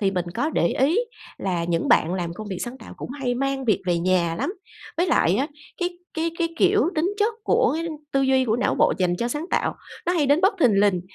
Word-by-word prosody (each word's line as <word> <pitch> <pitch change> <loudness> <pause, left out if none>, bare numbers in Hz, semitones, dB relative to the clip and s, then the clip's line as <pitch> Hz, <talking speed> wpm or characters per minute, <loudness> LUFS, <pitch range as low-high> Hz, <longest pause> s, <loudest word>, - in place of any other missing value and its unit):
thì 195 -2 +2
mình 180 -2 -1
có 305 - 0
để 170 - +2
ý 300 - +2 0.4
là 175 -3 -1
những 170 -1 -1
bạn 170 +4 +4
làm 170 -2 -3
công 215 +2 -7
việc 185 - -3
sáng 250 +2 -5
tạo - - -11
cũng - - -7
hay 260 -3 -2
mang 275 +1 -1
việc 205 -4 +1
về 175 -1 +2
nhà 170 -2 +1
lắm, 365 - -1 0.4
với 345 +2 +2
lại 195 - +3
á, 270 - +1 0.3
cái 355 0 -2 0.2
cái 330 +1 -1
cái, 335 -1 +1
kiểu, 415 +3 +4
tính 335 +5 +1
chất 430 +2 +2
của - - +3 0.4
tư 275 - +2
duy 265 -1 +3
của 225 -2 +1
não 245 - +1
bộ - - +3
dành 180 -1 +1
cho 235 - -1
sáng 295 +6 -3
tạo, - - 0 0.3
nó 350 - +2
hay 320 -5 +2
đến 285 +4 +4
bất 385 +3 +3
thình 215 -8 +4
lình. 200 -4 +3
255 Hz, 240 wpm, -24 LUFS, -, 0.4 s, bạn